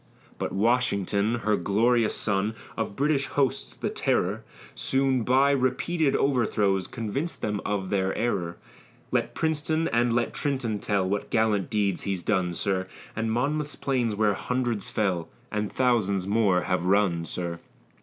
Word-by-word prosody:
But - - -2
Washington, 105 -1 +1
her 105 0 +3
glorious 110 +5 +2
son, 105 +1 0 0.2
Of 110 -3 -3
British 140 0 +1
hosts 135 -3 -1
the - - -2
terror, - - 0 0.3
Soon, 135 -1 +1
by 135 +4 +4
repeated 140 +4 +1
overthrows, 105 -8 +1
Convinc'd 125 +9 -4
them 105 -1 -1
of 100 -2 -2
their 95 -1 +1
error; 95 -7 -1 0.5
Let - - 0
Princeton, 160 +1 0
and 120 +1 +2
let 120 0 0
Trenton 130 -7 -1
tell, 100 -3 0
What 100 +1 -2
gallant 110 -4 +1
deeds 100 -4 0
he's 95 -3 -2
done, 90 -4 0
sir, 95 0 -1 0.3
And 115 0 -1
Monmouth's 145 +5 -1
plains 125 -6 0
where 105 -1 +3
hundreds 120 0 -2
fell, 90 -6 -1 0.2
And 105 -1 -2
thousands 105 -7 +1
more 100 -3 +3
have 90 +2 0
run, 95 -4 +3
sir. 85 0 -4
110 Hz, 145 wpm, -26 LUFS, 100-125 Hz, 0.5 s, by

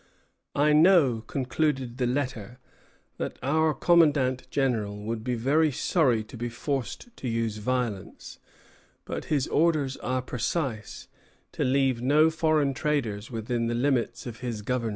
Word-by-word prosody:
"I 150 +1 +3
know," 155 -8 +5
concluded 130 -1 -1
the 125 - +1
letter, 125 -3 -3 0.6
"that - - -4
our 155 +3 +2
Commandant 140 -7 +3
General 115 -8 0
would 110 +2 -4
be 125 0 -1
very 145 +7 +2
sorry 130 -5 +1
to 110 - -13
be 120 +1 -3
forced 140 - -4
to 130 - -5
use 115 -2 -1
violence; 115 -3 -3 0.7
but - - -5
his 145 -4 0
orders 150 -4 +1
are 130 0 -2
precise, 125 -2 -3 0.4
to - - -2
leave 130 -2 +2
no 150 +5 +4
foreign 155 -3 +1
traders 120 -8 -2
within 115 0 -2
the 120 - -1
limits 120 -2 0
of 115 -2 -7
his 120 -4 -4
government." 120 0 -1
130 Hz, 140 wpm, -27 LUFS, 115-145 Hz, 0.7 s, know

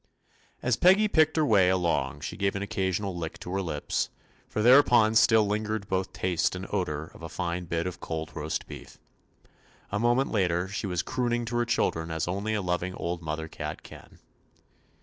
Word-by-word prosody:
As 125 -1 +2
Peggy 190 +4 +5
picked 155 -5 +3
her 155 - +3
way 100 -8 +4
along 90 -3 0
she - - -5
gave 100 0 0
an 100 - -2
occasional 95 -1 -2
lick 85 -2 -5
to 90 - -7
her 95 - 0
lips, 75 -5 -2 0.4
for 105 - -2
thereupon 120 -3 +6
still 110 -1 +5
lingered 105 0 -2
both 95 0 -1
taste 90 0 0
and 90 +1 -5
odor 80 -6 -2
of - - -14
a 80 - -7
fine 85 +1 -3
bit 85 0 -2
of 90 -1 -5
cold 80 0 -5
roast 80 0 -3
beef. - - -11 0.9
A 100 - -1
moment 120 +4 +2
later 90 -4 +1
she 100 +1 -4
was 90 -1 -1
crooning 120 -1 -1
to 120 +1 -4
her 120 - +2
children 80 -8 0
as 80 0 -2
only 100 +5 -1
a 105 - -1
lov 90 -1 0
ing 90 +1 -4
old 85 0 -3
mother 80 0 -4
cat - - -6
can. - - -14
95 Hz, 190 wpm, -27 LUFS, 85-110 Hz, 0.9 s, thereupon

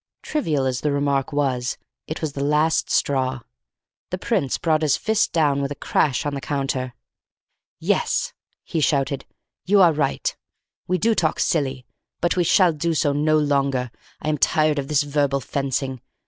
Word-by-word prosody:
Trivial 155 - 0
as 130 -1 -1
the 150 - 0
remark 140 -1 0
was, 130 -4 -1 0.3
it 155 - -5
was 150 -3 -2
the 140 - -3
last 150 +2 +2
straw. 130 -2 0 0.7
The 185 - -3
Prince 185 - 0
brought 160 -2 +1
his 150 -3 +2
fist 220 -1 +1
down 145 -4 +2
with 140 - -1
a - - -3
crash 140 -1 0
on 145 - -1
the 140 - -4
counter. 135 -3 -2 0.8
"Yes," - - 0 0.3
he 165 - -3
shouted, 140 -2 0 0.4
"you 200 +2 +3
are 175 -4 +6
right. 145 -2 -1 0.5
We 185 - +1
do 225 +7 +2
talk 160 -6 0
silly; 135 -7 0 0.3
but 175 - +1
we 180 - +2
shall 175 0 +4
do 165 +2 -1
so 145 -1 +2
no 155 +2 +2
longer. 140 -4 +1 0.3
I 155 - -3
am 150 -2 0
tired 155 0 +2
of 135 - -4
this 150 0 +2
verbal 145 -1 0
fencing. 135 -1 -3
145 Hz, 170 wpm, -22 LUFS, 135-155 Hz, 0.8 s, are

